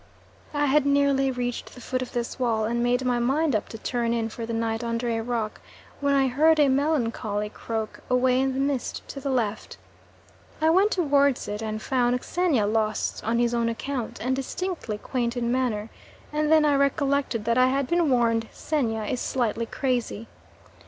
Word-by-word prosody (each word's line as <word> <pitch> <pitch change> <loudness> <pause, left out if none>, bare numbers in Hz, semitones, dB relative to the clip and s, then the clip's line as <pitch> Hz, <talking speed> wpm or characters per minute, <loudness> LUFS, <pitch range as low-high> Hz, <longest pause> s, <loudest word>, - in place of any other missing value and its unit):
I 290 0 +2
had 290 +1 +4
nearly 280 -1 +3
reached 245 -1 -4
the - - -11
foot 255 +1 -3
of 255 - -5
this 240 +2 -3
wall 225 -3 +1
and 235 +2 -1
made 245 +1 +1
my 245 -1 +1
mind 275 +3 +1
up 215 - -2
to 225 - -7
turn 235 +1 -1
in 225 -1 -1
for 225 +1 -6
the - - -4
night 225 0 -1
under 235 +1 -2
a 225 0 -1
rock, 225 -2 -3 0.4
when 280 -1 +2
I 270 -1 +4
heard 310 +5 +4
a 290 -2 +5
melancholy 230 -7 0
croak 220 0 -5
away 250 0 +3
in 265 0 +1
the - - -1
mist 275 -2 -2
to 275 - -6
the 275 - -3
left. 220 -5 -2 0.8
I 320 +1 +4
went 385 +5 +4
towards 285 - +2
it 210 +1 -4
and 215 -1 -3
found 250 -1 +1
Xenia 335 - +1
lost 215 0 -1
on 230 +2 0
his 240 0 +2
own 235 -1 +1
account, 245 +1 -4
and 255 +2 0
distinctly 270 - -4
quaint 240 +1 -2
in 235 -1 0
manner, 235 -4 -1 0.4
and 305 0 +1
then 315 -1 +6
I 295 - +4
recollected 280 -4 +1
that 235 +2 +2
I 255 - +6
had 275 +1 +1
been 340 +2 +2
warned 230 -3 +2
Xenia 230 -8 -1
is 240 +4 -2
slightly 230 -2 -1
crazy. 245 -4 -2
250 Hz, 190 wpm, -25 LUFS, 230-280 Hz, 0.8 s, then